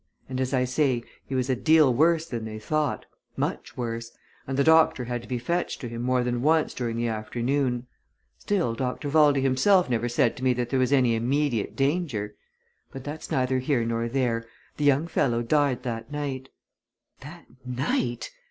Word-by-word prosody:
And 130 0 -3
as 130 - -1
I 130 -2 +2
say, 125 -2 +1 0.2
he 135 - -3
was 130 -1 0
a 130 - +1
deal 155 0 +4
worse 160 +5 +3
than 120 -8 -5
they 110 0 -6
thought, 150 +6 -1 0.3
much - - -3
worse, 115 -1 -4 0.4
and 135 0 -3
the 140 - +4
doctor 160 -5 +5
had 120 0 -3
to 120 - -13
be 125 - -2
fetched 170 +9 -2
to 125 - -4
him 115 0 -6
more 125 0 +1
than 120 -1 -1
once 155 +2 +2
during 115 -2 -3
the 120 0 0
afternoon. 120 +3 -1 0.5
Still 180 - 0
Dr. 130 +4 -3
Valdey 145 -2 +4
himself 135 +5 +3
never 120 0 0
said 120 0 +2
to 130 - -7
me 130 -1 +4
that 120 -1 -3
there 135 - +2
was 130 +1 +1
any 130 -4 +4
immediate 125 0 0
danger. 135 - -1 0.6
But 135 - -8
that's 150 +3 -7
neither 130 0 +1
here 130 -2 0
nor 115 0 -1
there 115 -3 -1 0.3
the 150 - -1
young 145 +2 +4
fellow 120 -7 0
died 135 -1 +1
that 115 -1 -5
night." 135 -3 -4 0.7
"That 160 +5 -11 0.2
night!" 125 -2 -2
130 Hz, 185 wpm, -26 LUFS, 120-145 Hz, 0.7 s, doctor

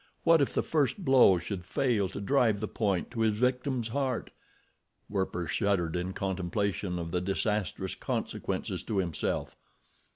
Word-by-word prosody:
What 165 -2 +6
if 140 - +2
the - - +2
first 160 +5 0
blow 130 -9 +6
should 90 +1 -5
fail 105 0 +1
to - - -6
drive 110 -1 +2
the 110 - -2
point 100 -4 -1
to 120 - -6
his 110 -2 +2
victim's 125 0 0
heart? 130 -1 -2 0.8
Werper 95 -3 -2
shuddered 85 -1 0
in 90 +1 -2
contemplation 95 0 -2
of 85 -1 -4
the 90 - 0
disastrous 95 0 -1
consequences - - -3
to 105 - -3
himself. 90 -5 -1
100 Hz, 150 wpm, -30 LUFS, 90-125 Hz, 0.8 s, What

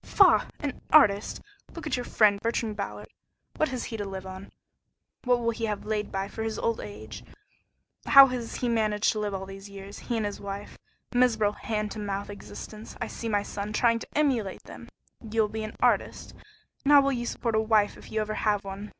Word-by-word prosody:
"Faugh! - - +5
An 285 -3 -4
artist? 210 -9 +5 0.3
Look 335 - -7
at 305 - 0
your 245 -1 -3
friend, 205 -2 +4
Bertrand 230 -2 -1
Ballard. 200 -1 -5 0.5
What 310 - +2
has 255 -2 -3
he 225 - -5
to 205 - -3
live 190 -1 -6
on? 190 +1 -8 0.8
What 245 -1 +3
will 230 0 +1
he 230 0 -3
have 210 -2 -3
laid 210 -1 -2
by 195 0 -2
for 220 - -7
his 220 -1 -2
old 230 -1 0
age? 105 +2 -8 0.8
How 275 0 +10
has 250 -3 -4
he 250 - -1
managed 215 -3 +2
to 215 - -3
live 205 -2 -2
all 190 0 -4
these 195 +1 -10
years 200 0 -9
he 235 - -3
and 220 - 0
his 205 - -4
wife? 200 0 -6 0.4
Miserable 225 -4 +3
hand 210 -2 -3
to 220 - -6
mouth 200 0 -3
existence! 200 - -9
I'll - - -3
see 230 - -5
my 205 -1 +1
son 205 +1 -5
trying 230 +1 +3
to - - -8
emulate 250 -10 0
him! - - -11 0.3
You'll 220 -1 0
be 220 0 -4
an 215 - -6
artist? - - +1 0.5
And 290 - +4
how 285 - +9
will 275 0 +1
you 240 -2 -2
support 235 -1 -2
a 220 - +3
wife 215 -2 +2
if - - -14
you 220 - 0
ever 215 0 -2
have 210 -2 +1
one? 195 +1 -7
215 Hz, 210 wpm, -27 LUFS, 200-230 Hz, 0.8 s, How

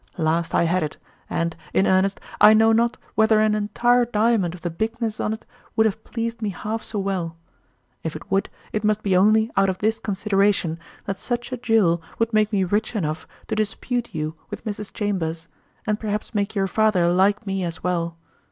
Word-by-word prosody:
Last 165 0 0
I - - +4
had 175 +2 +2
it, 155 -1 -3 0.3
and, 170 0 -1 0.2
in 190 - +4
earnest, 190 +1 +2 0.2
I 215 +1 +9
know 225 +1 +5
not 235 +2 +2 0.2
whether 220 0 +4
an 215 0 +3
entire 240 +4 +2
diamond 220 -6 +1
of 175 - -13
the 175 - -3
bigness 225 +4 -2
on't 220 +1 -2 0.3
would 220 - +4
have 220 0 -1
pleased 230 -1 -4
me 215 - 0
half 215 +4 -4
so 215 - -6
well; 185 -4 -2 0.6
if 160 - -4
it - - -10
would, 195 0 +1 0.2
it 215 - -1
must 215 0 +1
be 195 -2 +2
only 215 +4 +4
out 195 0 +4
of 185 - -2
this 220 +2 0
consideration, 195 -5 +1 0.3
that 195 -1 -3
such 240 +4 -3
a 255 - -2
jewel 215 -8 +3 0.2
would 230 0 0
make 215 0 +3
me 200 -3 +2
rich 210 +5 0
enough 155 -5 -2 0.2
to - - 0
dispute 225 +3 -1
you 155 0 -3 0.2
with - - -7
Mrs. 210 -1 -5
Chambers, 170 -6 -2 0.4
and 210 0 0
perhaps 210 +1 -3
make 205 0 -1
your 195 -1 +2
father 195 -3 +2
like 200 +4 +3
me 195 -1 -1
as 165 -2 -5
well. 170 -2 -1
205 Hz, 195 wpm, -23 LUFS, 180-220 Hz, 0.6 s, I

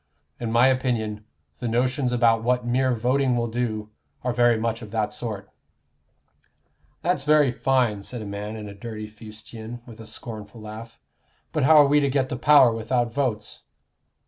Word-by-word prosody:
In 115 -2 -3
my 120 +2 +5
opinion, 115 -5 -1 0.3
the 120 - -3
notions 125 +3 0
about 115 -2 +3
what 125 +1 +1
mere 130 +2 +2
voting 125 +2 +1
will 120 0 0
do 110 -2 -3 0.3
are 125 -1 0
very 120 -1 +4
much 115 +1 -2
of 110 - -9
that 105 -1 -1
sort." 105 -4 -4 1.6
"That's 175 -5 +1
very 150 -2 +4
fine," 125 -5 +1
said 115 +3 -6
a - - -7
man 105 +2 -5
in 110 -1 -7
dirty 110 -1 -6
fustian, 110 +2 -10
with 115 -2 -13
a 110 - -9
scornful 110 -2 -7
laugh. 110 +2 -9 0.5
"But - - +1
how 155 +2 +7
are 145 - +8
we 145 +1 +4
to 140 -1 +1
get 130 -1 0
the - - -3
power 140 -3 +6
without 115 +1 -1
votes?" 120 -7 -2
120 Hz, 170 wpm, -24 LUFS, 110-130 Hz, 1.6 s, are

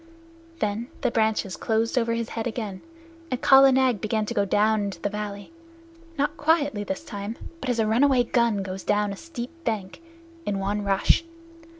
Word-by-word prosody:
Then 215 0 -2
the 250 -4 +1
branches 220 -4 +1
closed 225 +1 0
over 230 -2 +1
his 230 0 -3
head 230 +1 -3
again, 215 -5 -5 0.5
and 255 - -2
Kala 270 0 +7
Nag 255 -5 +2
began 215 0 0
to - - -4
go 200 - +1
down 215 +2 +2
into 200 -4 -4
the 205 - -2
valley 205 +3 -5 0.7
not 290 +3 0
quietly 295 -8 +2
this 190 -1 -4
time, 205 +2 -6 0.2
but 265 - -4
as 245 - +1
a 225 - +2
runaway 250 +3 +4
gun 235 -4 +1
goes 190 0 -5
down 205 -1 +1
a - - -6
steep 245 -1 -7
bank 215 - -3 0.4
in 205 -8 -2
one 200 +2 -1
rush. 200 +10 +3
220 Hz, 180 wpm, -25 LUFS, 205-245 Hz, 0.7 s, Kala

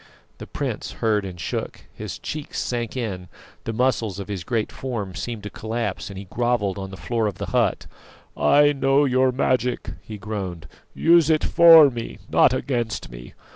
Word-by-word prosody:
The - - -8
prince - - -4
heard 105 -3 0
and 90 -2 -8
shook, - - -4
his - - -7
cheeks 150 -1 -6
sank 120 0 -3
in, 95 -7 -4 0.4
the 115 - -2
muscles 115 -4 0
of 100 0 -7
his 95 -4 -4
great 110 +3 -2
form 115 -8 -5
seemed 115 +1 -5
to 105 - -6
collapse, 110 -3 -4
and 100 - -9
he 100 - -7
grovelled 105 -1 -1
on 95 0 -6
the 95 - -9
floor 110 +6 -1
of 100 - -4
the - - -4
hut. - - +1 0.5
"I 145 - +4
know 140 +1 +3
your 130 0 +3
magic," 125 -1 0
he 110 - -9
groaned; 95 -6 -5 0.3
"use 165 -2 +4
it 155 -1 +3
for 165 -4 +8
me, 115 -2 -6
not - - +5
against 120 - -2
me! - - -11
115 Hz, 175 wpm, -23 LUFS, 100-130 Hz, 0.5 s, for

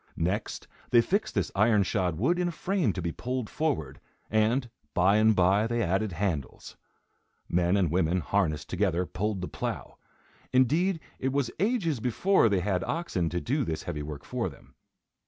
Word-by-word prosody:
Next, 95 +6 -2 0.2
they 120 - +6
fixed 195 - 0
this - - 0
iron 105 0 +4
shod 90 -5 -1
wood 170 - +1
in 180 - +1
a - - -1
frame 175 - 0
to 90 - -4
be 85 - -1
pulled 125 +3 -4
forward, 130 - -2 0.3
and, 110 +4 +2 0.3
by 95 +4 +4
and 110 0 +4
by, 95 +4 +3
they 120 0 0
added 95 +2 0
handles. 85 -6 -3 0.7
Men 90 +2 +2
and 90 -6 +1
women, 90 0 +1
harnessed 75 -6 0
together, 90 -2 0
pulled 100 +2 -2
the 90 - -3
plough. - - -5 0.5
Indeed 160 +8 +3 0.2
it 130 - 0
was 140 -3 0
ages 195 - +1
before 125 - +3
they 100 -3 +1
had 90 -1 0
oxen 95 - -1
to 90 - -2
do 140 - 0
this 80 -8 -3
heavy 80 -4 -4
work 75 -1 -7
for - - -2
them. - - -17
105 Hz, 175 wpm, -28 LUFS, 90-130 Hz, 0.7 s, they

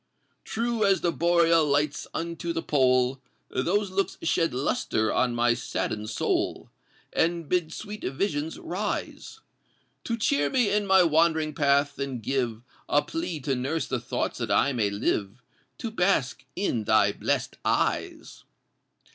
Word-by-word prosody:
True 230 0 -1
as 195 -1 +3
the 175 - +1
Boreal 170 -1 +3
Lights 145 0 0
unto 170 0 -3
the 165 - -3
Pole, 130 -2 +2 0.3
Those 195 +8 0
looks 195 +1 -1
shed 165 -1 +1
lustre 110 -4 0
on 125 -2 +1
my 120 0 +3
sadden'd 105 -3 -3
soul, 110 - -1 0.4
And 170 -1 0
bid 175 -2 0
sweet 210 +4 -7
visions 150 +2 -2
rise 210 - -4 0.6
To 230 - -1
cheer 145 -9 +1
me 245 - +2
in 205 -1 +1
my 190 -1 +6
wandering 160 -1 +2
path, 140 -1 +2
and 135 -3 -3
give 120 -3 -1 0.3
A 145 - +3
plea 325 - -4
to 135 0 -1
nurse 135 +3 -1
the - - -2
thought - - -2
that - - -3
I 140 - +3
may 110 -5 +1
live 100 +3 -2 0.3
To 230 - -5
bask 180 - 0
in 120 - -1
thy 105 -1 +4
bless'd - - -2
eyes! - - -1
155 Hz, 145 wpm, -26 LUFS, 130-180 Hz, 0.6 s, my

